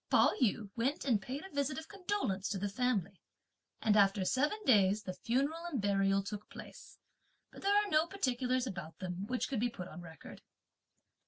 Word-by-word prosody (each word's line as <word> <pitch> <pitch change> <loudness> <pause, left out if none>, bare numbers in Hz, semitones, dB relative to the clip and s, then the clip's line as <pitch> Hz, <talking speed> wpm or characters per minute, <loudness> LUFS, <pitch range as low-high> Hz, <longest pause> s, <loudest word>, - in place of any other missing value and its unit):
Pao - - +5
yü 215 -3 +1
went 260 +6 -1
and 230 -7 +2
paid 270 - -5
a 385 - -12
visit 280 -1 -1
of 320 - -6
condolence 370 - -2
to 200 - -1
the 200 +2 -1
family, 200 -4 -1 0.6
and 215 -1 +4
after 195 -2 +4
seven 295 - +1
days 205 -3 +4
the 185 - -4
funeral 275 - -1
and 315 -7 -2
burial 195 -1 +2
took 210 +1 -7
place, - - -11 0.5
but - - -12
there 400 +1 +3
are 415 0 +4
no 315 -3 +3
particulars 255 -8 0
about 175 -8 -6
them 185 +1 -5
which 255 +1 -1
could 265 -5 -2
be 240 +2 +1
put 180 -6 -7
on 175 - -9
record. 160 -3 -11
230 Hz, 185 wpm, -34 LUFS, 195-280 Hz, 0.6 s, Pao